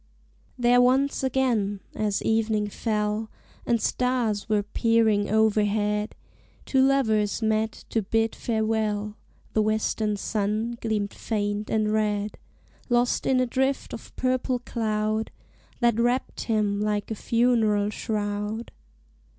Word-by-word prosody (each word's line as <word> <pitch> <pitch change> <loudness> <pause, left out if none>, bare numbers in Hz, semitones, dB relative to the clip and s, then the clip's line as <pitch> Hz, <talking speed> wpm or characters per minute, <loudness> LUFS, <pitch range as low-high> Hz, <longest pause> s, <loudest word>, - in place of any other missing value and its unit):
There 245 0 +4
once 265 +3 +2
again, 235 -7 +1
as 210 -2 -1
evening 220 -2 +1
fell 210 0 -1 0.4
And 235 -1 +2
stars 235 -3 0
were 210 -1 +2
peering 220 -1 +2
overhead, 210 0 +1 0.5
Two 265 - +2
lovers 225 -6 +2
met 220 0 0
to 225 - +1
bid 225 +2 0
farewell: 215 -2 -1 0.4
The 215 - +3
western 215 0 0
sun 215 +3 -2
gleamed 210 -3 -1
faint 205 -1 -2
and 215 -1 +1
red, 210 -1 -1 0.5
Lost 240 0 +2
in 260 -1 +3
a 255 - +3
drift 265 +2 -1
of - - -9
purple 255 0 0
cloud 220 -2 -1 0.5
That 235 -2 +3
wrapped 245 +2 0
him 210 -3 0
like 210 0 -1
a - - +1
funeral 220 -3 +2
shroud. 210 +1 -3
220 Hz, 120 wpm, -26 LUFS, 210-235 Hz, 0.5 s, There